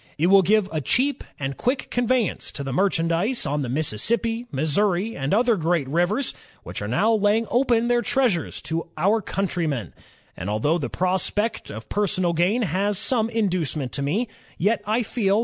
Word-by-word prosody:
It 160 +3 +2
will 195 0 +8
give 205 +2 +3
a 155 - -2
cheap 265 - 0 0.2
and 135 -1 -3
quick 255 +2 -1
conveyance 245 -3 0
to 140 - -5
the 135 -2 -4
merchandise 180 - +1
on 145 0 -1
the 130 - -3
Mississippi, 225 - 0
Missouri, 175 +9 +1
and 135 +1 -3
other 235 +2 +3
great 165 -5 0
rivers, 175 - 0 0.3
which - - -6
are - - -3
now 225 - +2
laying 215 +1 +2
open 240 -2 +2
their 240 0 +2
treasures 240 - 0
to 165 +1 -3
our 200 +8 +2
countrymen; 170 - -2 0.4
and 90 - -5
although 145 +11 +1
the 140 - -3
prospect 190 +4 -1
of 110 +1 -8
personal 185 -4 0
gain 185 +9 +2
has 200 +3 0
been - - -1
some 230 -4 +1
inducement 175 - 0
to 140 - -2
me, 185 - 0 0.3
yet 210 +5 +1
I 225 +3 +1
feel 205 -2 +1
195 Hz, 175 wpm, -23 LUFS, 160-225 Hz, 0.4 s, will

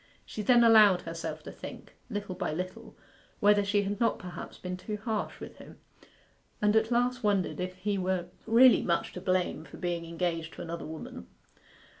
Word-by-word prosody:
She 215 - -5
then 240 +3 +5
allowed 215 -5 +7
herself 165 0 -5
to - - -8
think, - - -10
little 205 -4 -4
by 180 - -3
little, 185 +3 -6 0.4
whether 205 0 +5
she 205 0 +1
had 200 0 -3
not 230 - +2
perhaps 180 -1 -8
been 180 0 -5
too 210 +3 -5
harsh 215 0 -3
with - - -9
him; - - -13 0.8
and 210 +1 +2
at 220 0 +3
last 245 +1 +1
wondered 200 -3 +1
if 185 0 -3
he 200 +2 -2
were 185 -1 -1 0.2
really 240 +2 +7
much 185 +5 -1
to 180 - -7
blame 185 -4 0
for 145 - -12
being 175 -2 -2
engaged 165 -1 -3
to - - -7
another 170 -1 -6
woman. 160 0 -8
195 Hz, 180 wpm, -29 LUFS, 180-215 Hz, 0.8 s, allowed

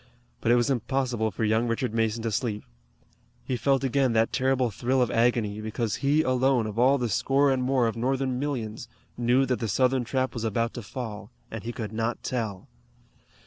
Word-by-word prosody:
But 115 - +1
it - - +6
was 120 +2 +2
impossible 125 -3 0
for 110 - -4
young 110 +2 +2
Richard 115 0 -1
Mason 115 0 0
to 115 - -1
sleep. 105 -1 -2 0.8
He 130 - -2
felt 135 +2 +1
again 135 -2 +2
that 115 0 +2
terrible 130 -2 +1
thrill 125 +6 0
of 125 - +2
agony, 115 -3 +1
because 110 0 -2
he, 145 +3 +2
alone, 130 -2 +2
of 110 +1 -4
all 130 +3 +5
the 125 -2 -1
score 135 +6 +2
and 130 -1 +1
more 130 -1 +2
of 115 - -1
Northern 130 +1 -1
millions, 115 -6 -4 0.3
knew 125 +3 +2
that 125 -1 -1
the 115 - -2
Southern 130 +4 +2
trap 130 +2 -1
was 115 - -4
about 115 +1 -1
to 120 - -6
fall, 110 -1 -7 0.2
and 110 -2 -6
he 120 - -4
could 110 -3 -6
not 115 +2 -2
tell. 110 -7 -3
120 Hz, 195 wpm, -26 LUFS, 110-130 Hz, 0.8 s, it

